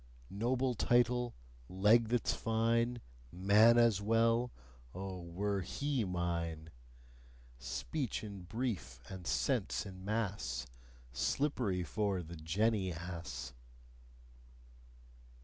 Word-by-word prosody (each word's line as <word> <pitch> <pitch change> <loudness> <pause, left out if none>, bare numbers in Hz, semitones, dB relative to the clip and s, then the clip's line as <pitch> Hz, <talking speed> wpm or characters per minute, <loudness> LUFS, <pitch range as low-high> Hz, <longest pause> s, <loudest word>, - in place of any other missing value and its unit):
Noble 125 +5 +1
title, 120 +1 +2 0.3
leg 105 +5 +4
that's 120 +1 +1
fine, 115 +2 +1 0.3
Man 105 +6 +6
as 115 -4 +4
well: 115 +3 +3 0.4
Oh, 95 -1 -5
were 95 +4 -2
HE 135 +6 -1
mine! 85 -3 -2 0.9
Speech 70 - -3
in 100 -3 -7
brief 90 - -3
and 95 -2 -7
sense - - 0
in 95 -1 -9
mass 100 - -2 0.5
Slippery 95 - 0
for 100 -1 -1
the 85 +2 -9
jenny 95 +5 +1
ass! 80 -8 -6
100 Hz, 95 wpm, -35 LUFS, 85-115 Hz, 0.9 s, Man